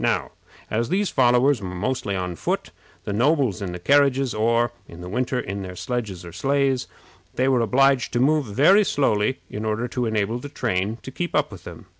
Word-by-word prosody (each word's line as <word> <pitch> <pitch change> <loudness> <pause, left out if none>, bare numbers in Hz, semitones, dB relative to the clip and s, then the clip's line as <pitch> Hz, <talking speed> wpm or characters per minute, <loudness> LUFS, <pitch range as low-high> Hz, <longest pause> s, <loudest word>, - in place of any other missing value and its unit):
Now, - - 0 0.4
as 115 +2 0
these 195 +3 0
followers 125 0 +3
were 95 - -5
mostly 100 0 -2
on 90 -2 -3
foot, - - -3 0.3
the 100 - -3
nobles 130 - +2
in 95 -3 -3
the 90 - -5
carriages, 135 +4 +3
or, 115 +2 +2 0.2
in 85 +1 -11
the 90 - -7
winter, 125 +5 -1
in 100 -2 -4
their 90 -1 -7
sledges 105 -7 -4
or 85 - -9
sleighs, 135 +3 0 0.5
were 130 -1 +3
obliged 135 +2 +3
to 120 - +1
move 145 +1 +2
very 155 - +5
slowly 130 - +1
in 105 - -6
order 110 +2 -1
to 125 -1 -2
enable 110 +2 -1
the 145 - -8
train 100 -3 -1
to 130 - -7
keep 175 +6 -4
up 150 -4 +1
with 95 -4 -11
them. 115 - -10
120 Hz, 195 wpm, -23 LUFS, 100-135 Hz, 0.5 s, very